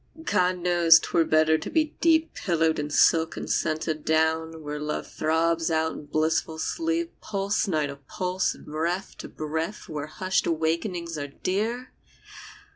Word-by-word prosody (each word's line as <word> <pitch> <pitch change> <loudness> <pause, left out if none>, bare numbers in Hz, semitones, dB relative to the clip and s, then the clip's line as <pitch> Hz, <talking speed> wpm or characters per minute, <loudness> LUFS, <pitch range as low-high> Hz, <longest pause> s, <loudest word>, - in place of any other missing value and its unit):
God 180 - +1
knows 175 -2 +6
'twere 165 -1 +1
better 155 0 +3
to - - -6
be 310 -2 0
deep 325 -1 +3
Pillowed 165 -4 0
in 150 0 -3
silk 160 +2 +3
and - - -5
scented 155 -1 -1
down, 160 0 0
Where 150 0 -4
Love 150 0 -3
throbs 165 +1 0
out 160 0 +1
in - - -9
blissful 160 +1 0
sleep, 330 - -2
Pulse 200 0 -1
nigh 155 -5 +1
to 140 -1 -6
pulse, 180 +7 -2
and - - -15
breath 170 +5 -3
to - - -6
breath, 160 +6 -4
Where 150 -1 -5
hushed 185 +4 -1
awakenings 170 +1 -1
are 145 - -4
dear 220 - -3
165 Hz, 155 wpm, -26 LUFS, 155-185 Hz, -, knows